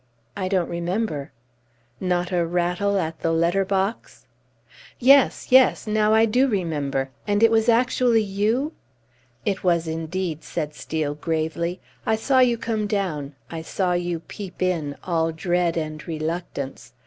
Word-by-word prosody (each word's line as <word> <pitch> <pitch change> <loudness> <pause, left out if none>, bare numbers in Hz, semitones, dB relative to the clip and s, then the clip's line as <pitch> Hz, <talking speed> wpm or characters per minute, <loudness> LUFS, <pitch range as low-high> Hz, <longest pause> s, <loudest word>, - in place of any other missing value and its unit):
"I 185 - -2
don't 185 -3 +1
remember." 170 -3 -2 0.7
"Not 180 -1 0
a 175 -2 +2
rattle 180 +4 0
at 165 -3 -2
the 165 - 0
letter 170 +4 +2
box?" 195 +3 -2 0.7
"Yes! 270 +1 +4
Yes! 260 0 +5
Now 215 0 +2
I 220 +1 +5
do 250 +5 +3
remember. 145 - -1 0.2
And 205 +1 +2
it 230 - +6
was 225 +1 +3
actually 235 -1 +3
you!" 215 +9 0 0.7
"It 195 -2 -1
was, 170 -2 +2
indeed," 165 0 -3
said 150 -3 -4
Steel, 150 -1 -3
gravely. 160 +3 -2 0.2
"I 220 - +2
saw 260 +4 +2
you 245 -2 +4
come 225 -2 -2
down, 160 -9 -2 0.2
I 165 -1 -4
saw 180 +2 -1
you 175 -1 -2
peep 190 +1 -9
in 160 -6 -1
all 165 -2 0
dread 175 +1 0
and 155 -2 -4
reluctance! 160 -3 -4
180 Hz, 145 wpm, -23 LUFS, 160-215 Hz, 0.7 s, it